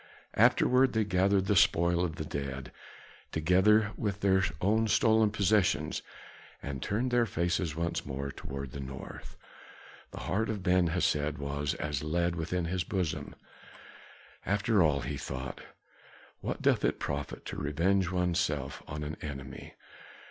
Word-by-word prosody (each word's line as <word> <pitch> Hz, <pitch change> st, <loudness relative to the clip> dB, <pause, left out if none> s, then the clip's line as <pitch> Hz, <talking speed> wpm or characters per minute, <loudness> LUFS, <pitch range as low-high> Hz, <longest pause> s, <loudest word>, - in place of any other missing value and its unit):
Afterward 130 Hz, +1 st, +4 dB
they 110 Hz, -1 st, +2 dB
gathered 95 Hz, 0 st, +2 dB
the 105 Hz, -, +2 dB
spoil 85 Hz, 0 st, +4 dB
of 80 Hz, -3 st, -2 dB
the 80 Hz, -, -5 dB
dead, 70 Hz, -2 st, -5 dB, 0.6 s
together 95 Hz, +6 st, +4 dB
with 105 Hz, -1 st, -3 dB
their 95 Hz, -1 st, +3 dB, 0.2 s
own 110 Hz, +4 st, +2 dB
stolen 110 Hz, 0 st, +4 dB
possessions 95 Hz, -7 st, +1 dB, 0.6 s
and 70 Hz, -2 st, -6 dB
turned 120 Hz, +5 st, -1 dB
their 120 Hz, -1 st, +3 dB
faces 85 Hz, -3 st, -1 dB
once 85 Hz, +1 st, -2 dB
more 70 Hz, +1 st, -4 dB
toward 70 Hz, -2 st, -7 dB
the 70 Hz, -, -7 dB
north. 65 Hz, 0 st, -8 dB, 0.7 s
The -, -, -8 dB
heart 110 Hz, +4 st, -1 dB
of 105 Hz, -4 st, -3 dB
Ben 90 Hz, -1 st, +3 dB
Hesed 75 Hz, -3 st, 0 dB
was 70 Hz, 0 st, -2 dB
as 75 Hz, -2 st, -3 dB
lead 85 Hz, +3 st, 0 dB
within 85 Hz, +1 st, -2 dB
his 90 Hz, +1 st, -1 dB
bosom. 90 Hz, -4 st, -3 dB, 1.1 s
"After 105 Hz, +1 st, +2 dB
all," 75 Hz, -5 st, +3 dB
he 70 Hz, +3 st, -4 dB
thought, 65 Hz, -1 st, -6 dB, 0.8 s
"what -, -, -4 dB
doth -, -, +3 dB
it -, -, +1 dB
profit 70 Hz, 0 st, -4 dB
to -, -, -6 dB
revenge 85 Hz, +6 st, +1 dB
oneself 85 Hz, -6 st, -1 dB
on 75 Hz, +1 st, -5 dB
an 75 Hz, +1 st, -5 dB
enemy? 70 Hz, -3 st, -7 dB
85 Hz, 140 wpm, -30 LUFS, 75-100 Hz, 1.1 s, Afterward